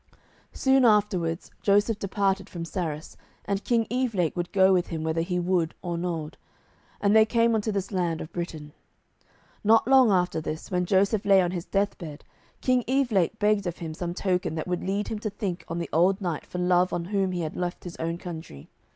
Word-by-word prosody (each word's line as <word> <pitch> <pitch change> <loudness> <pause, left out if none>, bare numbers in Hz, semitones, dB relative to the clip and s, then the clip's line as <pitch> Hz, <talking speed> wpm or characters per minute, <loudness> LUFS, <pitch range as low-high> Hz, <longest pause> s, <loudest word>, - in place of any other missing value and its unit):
"Soon 265 0 +3
afterwards 200 -7 +2
Joseph 205 +2 +2
departed 195 -1 -1
from 170 -2 -6
Sarras, 160 -4 -4 0.3
and 200 0 -2
King 230 -2 +2
Evelake 225 -10 0
would 175 0 -3
go 190 -1 +5
with 180 -1 +2
him 160 -2 -4
whether 160 +1 0
he 180 +1 -2
would 175 -2 0
or 175 -1 -2
nould, 170 -3 -4 0.6
and 205 +1 +3
they 220 - +8
came 230 +1 +2
unto 220 0 0
this 195 -1 -3
land 175 -4 -1
of 160 - -8
Britain. 155 -4 -6 0.9
Not 220 +2 +4
long 260 -3 +6
after 180 -4 +1
this, 155 +1 -6
when 180 -1 0
Joseph 200 +2 +2
lay 195 -1 +5
on 175 -1 +1
his 175 -2 -4
death 200 0 0
bed, 155 -4 -8 0.4
King 255 -1 +2
Evelake 230 -8 +1
begged 210 -2 +2
of 175 - -4
him 160 -2 -6
some 175 +1 -4
token 180 -4 -1
that 155 - -4
would 180 -1 -2
lead 200 +2 -1
him 220 - -3
to 215 - -3
think 195 -4 -4
on 165 - -4
the 170 - -3
old 185 +4 +3
knight 175 -6 -3
for - - -6
love 180 0 +2
of 170 - -2
whom 195 0 0
he 180 -1 -2
had 155 -2 -4
left 180 -1 -3
his 175 - -7
own 165 +1 -2
country. 160 - -9
185 Hz, 205 wpm, -26 LUFS, 170-205 Hz, 0.9 s, they